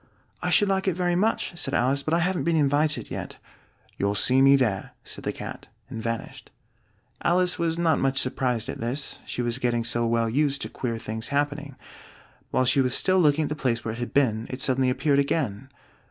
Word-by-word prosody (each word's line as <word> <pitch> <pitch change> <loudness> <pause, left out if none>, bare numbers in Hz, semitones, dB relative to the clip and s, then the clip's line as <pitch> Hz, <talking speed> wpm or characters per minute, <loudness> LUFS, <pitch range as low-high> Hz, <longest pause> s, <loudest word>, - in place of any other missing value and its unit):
"I - - -1
should 205 - +4
like 195 0 0
it 185 - +1
very 175 -1 0
much," 200 -1 0
said 135 - -2
Alice, 135 +3 +2
"but 155 +3 0
I 170 - +2
haven't 180 +2 0
been 170 -1 +1
invited 150 0 +1
yet." - - -5 0.6
"You'll 100 +1 0
see 130 +5 +4
me 135 +1 +7
there," 110 -8 0
said - - -5
the - - -1
Cat, - - -8 0.2
and 115 - -5
vanished. 115 0 -5 0.7
Alice 180 +1 +2
was 165 -1 0
not 170 -2 +2
much 135 0 +1
surprised 125 -3 -1
at - - -5
this, 125 +5 -3
she 125 - -3
was 120 +1 -1
getting 120 -2 0
so 120 0 0
well 115 0 +1
used 140 +4 +1
to - - -5
queer 115 -3 -3
things 110 0 -4
happening. 145 0 -2 0.7
While 130 - +1
she 130 +2 +4
was 125 -1 +2
still 185 0 +3
looking 155 -2 +3
at - - -2
the 150 - -2
place 120 -5 -1
where 110 - -2
it 115 - -8
had 120 - -4
been, 115 -5 +1
it 130 - -5
suddenly 130 -1 +2
appeared 140 +2 +2
again. 135 -4 -1
135 Hz, 210 wpm, -25 LUFS, 120-155 Hz, 0.7 s, me